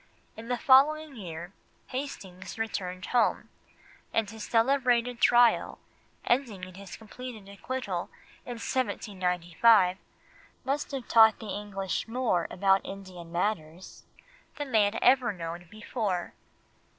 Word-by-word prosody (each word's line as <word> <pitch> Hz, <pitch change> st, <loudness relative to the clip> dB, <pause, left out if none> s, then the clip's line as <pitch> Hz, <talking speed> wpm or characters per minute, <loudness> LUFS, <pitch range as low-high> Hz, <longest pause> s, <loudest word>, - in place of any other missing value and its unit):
In 225 Hz, +1 st, -9 dB
the 245 Hz, 0 st, -1 dB
following 300 Hz, +2 st, +4 dB
year, 175 Hz, -3 st, -8 dB, 0.4 s
Hastings 195 Hz, -9 st, -6 dB
had -, -, -16 dB
returned 185 Hz, -4 st, -3 dB
home, 240 Hz, -3 st, +1 dB, 0.6 s
and 225 Hz, -2 st, +1 dB
his 220 Hz, +1 st, -8 dB
celebrated 245 Hz, 0 st, +2 dB
trial, 240 Hz, -1 st, +4 dB, 0.5 s
ending 240 Hz, -7 st, 0 dB
in 185 Hz, 0 st, -7 dB
his 195 Hz, 0 st, -10 dB
complete 245 Hz, +2 st, -9 dB
acquittal 200 Hz, -3 st, -4 dB, 0.3 s
in 245 Hz, -, -6 dB
1795, 190 Hz, -4 st, +2 dB, 0.7 s
must 285 Hz, +2 st, -1 dB
have 270 Hz, -4 st, -5 dB
taught 220 Hz, -1 st, +6 dB
the 220 Hz, -, -9 dB
English 195 Hz, -1 st, -3 dB
more 225 Hz, -7 st, 0 dB
about 195 Hz, +1 st, +2 dB
Indian 185 Hz, -4 st, -9 dB
matters 175 Hz, -2 st, -3 dB, 0.5 s
than 290 Hz, -3 st, -5 dB
they 215 Hz, -3 st, +5 dB
had 205 Hz, +2 st, -1 dB
ever 250 Hz, -2 st, +5 dB
known 170 Hz, -2 st, -7 dB
before. 215 Hz, -4 st, -3 dB
215 Hz, 120 wpm, -28 LUFS, 185-245 Hz, 0.7 s, taught